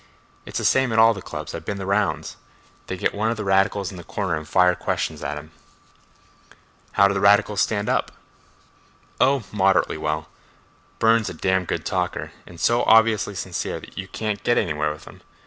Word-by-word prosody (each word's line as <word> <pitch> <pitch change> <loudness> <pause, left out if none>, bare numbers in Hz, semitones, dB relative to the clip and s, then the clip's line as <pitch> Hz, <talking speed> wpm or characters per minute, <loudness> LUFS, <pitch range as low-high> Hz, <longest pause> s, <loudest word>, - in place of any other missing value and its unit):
It's - - -4
the - - -2
same 130 -2 +3
at 110 - 0
all 115 +1 +6
the 95 - -8
clubs; - - -7
I've - - -6
been 100 - -4
the 95 - -5
rounds. 100 +2 -1 0.5
They 95 - -4
get - - 0
one 110 +2 0
of 115 - -2
the 105 - -3
radicals 95 0 +1
in 95 - -10
the 85 - -9
corner 95 0 -2
and 75 0 -6
fire 90 +1 +4
questions 80 -3 -3
at 75 +1 -3
him." 75 +2 -10 1.4
"How 100 - +5
do 100 - 0
the 100 - -1
radicals 105 0 +4
stand 105 -1 0
up?" - - 0 1.1
"Oh, 135 -2 +3
moderately 95 -6 +2
well. 75 0 -2 0.7
Burne's 115 -1 +3
a - - -7
damn 95 +2 0
good - - -3
talker, - - -2 0.2
and 85 -1 -13
so 120 +6 +2
obviously 110 -2 +4
sincere 90 -1 -4
that - - -14
you 95 - -5
can't 105 +1 -4
get 120 - +2
anywhere 75 -5 0
with 75 - -10
him. - - -14
100 Hz, 195 wpm, -23 LUFS, 90-110 Hz, 1.4 s, all